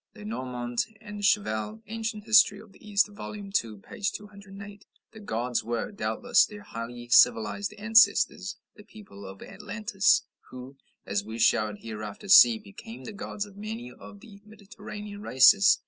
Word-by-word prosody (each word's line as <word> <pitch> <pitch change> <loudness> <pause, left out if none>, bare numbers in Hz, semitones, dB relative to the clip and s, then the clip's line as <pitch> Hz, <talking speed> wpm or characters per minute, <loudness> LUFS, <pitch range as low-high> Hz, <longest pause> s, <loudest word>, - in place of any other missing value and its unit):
(Lenormant 120 +3 -4
and 210 -2 -9
Cheval, 205 - 0
"Anc. 225 -1 -5
Hist. 220 -2 +6
of 205 0 -13
the 210 - -16
East," 200 0 +3
vol. 205 +1 -8
ii., 200 -1 -9
p. 110 - -4
208.) 200 0 -7 0.3
"The 220 - -13
gods" 125 - -2
were, 120 - -3
doubtless, 245 +4 +2
their 205 -1 -7
highly 120 - -8
civilized 120 - +3
ancestors 210 -2 +3 0.2
the 210 - -15
people 145 - -13
of 95 0 -11
Atlantis 205 +1 0 0.3
who, 130 +2 -10 0.3
as 100 0 -2
we 110 +2 -8
shall 110 -2 +2
hereafter 105 - -8
see, 230 +3 +8
became 220 +2 -12
the 220 - -8
gods 205 0 -5
of 205 -2 -16
many 220 +4 -7
of 205 - -14
the 200 -3 -15
Mediterranean 210 -1 -10
races. 195 +6 +5
200 Hz, 145 wpm, -27 LUFS, -, 0.3 s, see